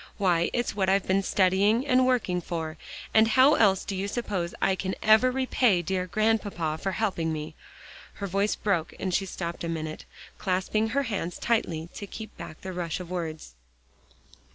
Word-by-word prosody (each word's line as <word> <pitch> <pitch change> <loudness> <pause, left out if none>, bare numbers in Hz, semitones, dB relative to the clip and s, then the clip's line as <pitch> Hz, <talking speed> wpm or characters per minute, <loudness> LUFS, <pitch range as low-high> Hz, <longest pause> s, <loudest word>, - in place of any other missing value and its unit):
Why, 175 -4 +2
it's 240 -4 -1
what 190 -2 +1
I've 195 0 +2
been 190 +1 +2
studying 200 +6 +2
and 255 -2 +4
working 210 -9 +1
for, 160 -2 -4 0.4
and 220 0 +6
how 260 +6 +6
else 195 -7 +3
do 195 - -3
you 195 +2 -2
suppose 200 -6 -3
I 195 - +2
can 190 0 -3
ever 220 +4 +6
repay 250 -7 +2
dear 185 +1 -1
Grandpapa 205 -6 0
for 195 -1 -1
helping 185 -7 -1
me?" 155 0 -5 0.6
Her 200 - -5
voice 200 +2 0
broke, 175 -6 -1
and 185 -1 -2
she 195 +2 +1
stopped 170 -1 -5
a 170 - -2
minute, 155 -1 -4 0.3
clasping 190 +3 0
her 280 +4 +1
hands 195 -8 -3
tightly 170 -9 -1
to 205 - -7
keep 220 +1 -9
back 155 - -9
the 190 0 -6
rush 175 -2 -3
of 180 -1 -8
words. 160 - -5
190 Hz, 175 wpm, -27 LUFS, 170-220 Hz, 0.6 s, and